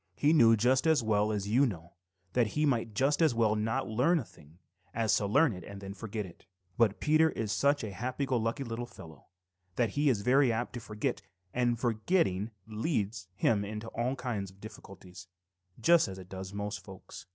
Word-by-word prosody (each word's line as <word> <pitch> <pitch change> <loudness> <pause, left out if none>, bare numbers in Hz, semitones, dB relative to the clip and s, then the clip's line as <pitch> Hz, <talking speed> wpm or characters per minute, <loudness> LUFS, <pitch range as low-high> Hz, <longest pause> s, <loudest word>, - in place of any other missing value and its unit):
He 150 +2 +3
knew 115 -7 +6
just 130 +7 +2
as 155 -6 +3
well 105 -1 +2
as 100 -2 -2
you 120 +7 +3
know 85 -5 -7 0.4
that 120 -3 +3
he 155 - +3
might 115 -6 0
just 140 +7 +2
as 155 -7 +4
well 110 -2 +2
not 110 +5 -1
learn 125 +11 +2
a 150 - -1
thing 75 -2 -19 0.4
as 115 -1 +2
to 100 - -1
learn 140 +4 +4
it 90 -2 -9
and 100 +2 -9
then 100 0 -7
forget 105 +1 -5
it. 85 - -15 0.3
But 110 -4 +2
Peter 155 +1 +4
is 110 -8 -3
such 140 +5 +2
a 105 - -4
happy 125 +8 -3
go 130 - -1
lucky 115 +5 -1
little 120 0 -5
fellow 80 - -14 0.5
that 115 -2 +1
he 145 +3 +2
is 115 -6 +1
very 130 +1 +4
apt 120 +2 -2
to 120 - -5
forget, 110 +3 -3 0.3
and 120 -1 +1
forgetting 115 - +1 0.2
leads 110 - -2
him 105 0 +2
into 105 +2 -6
all 125 +3 -2
kinds 120 -7 -4
of 95 +1 -20
difficulties, 95 -3 -12 0.5
just 170 +8 +5
as 95 -1 -7
it 95 -1 -11
does 95 0 -7
most 105 +1 -5
folks. 95 -2 -12
115 Hz, 200 wpm, -30 LUFS, 100-130 Hz, 0.5 s, knew